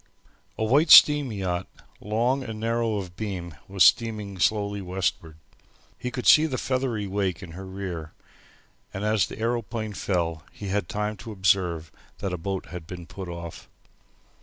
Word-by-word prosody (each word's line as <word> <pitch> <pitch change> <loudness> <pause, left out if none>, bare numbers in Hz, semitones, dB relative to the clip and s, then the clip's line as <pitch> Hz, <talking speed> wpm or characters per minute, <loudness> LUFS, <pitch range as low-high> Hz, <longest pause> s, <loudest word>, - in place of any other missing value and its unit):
A - - -1
white 145 +9 +3
steam 145 -4 +8
yacht, 95 -3 -2 0.3
long 120 +6 0
and 110 -3 -6
narrow 115 0 0
of 90 -4 -5
beam, 90 -6 -5
was 95 -2 +3
steaming 105 -2 +2
slowly 100 0 +1
westward. 90 -4 -2 0.6
He 125 - -4
could 125 +1 -5
see 155 +1 +7
the 130 -4 -3
feathery 130 -6 -1
wake 95 -2 -2
in 85 - -9
her 95 +3 -8
rear, 90 -5 -6 0.8
and 95 - -3
as 105 -1 +2
the - - -9
aeroplane 115 -1 -2
fell 85 -5 -1
he 100 - -7
had 100 -3 -1
time 105 0 -2
to 105 +5 -8
observe 90 -4 +1 0.3
that 95 -2 -3
a - - -2
boat 95 +2 -3
had 90 -3 -8
been 90 -1 -8
put 95 +1 -8
off. 85 -1 -8
100 Hz, 160 wpm, -26 LUFS, 90-110 Hz, 0.8 s, steam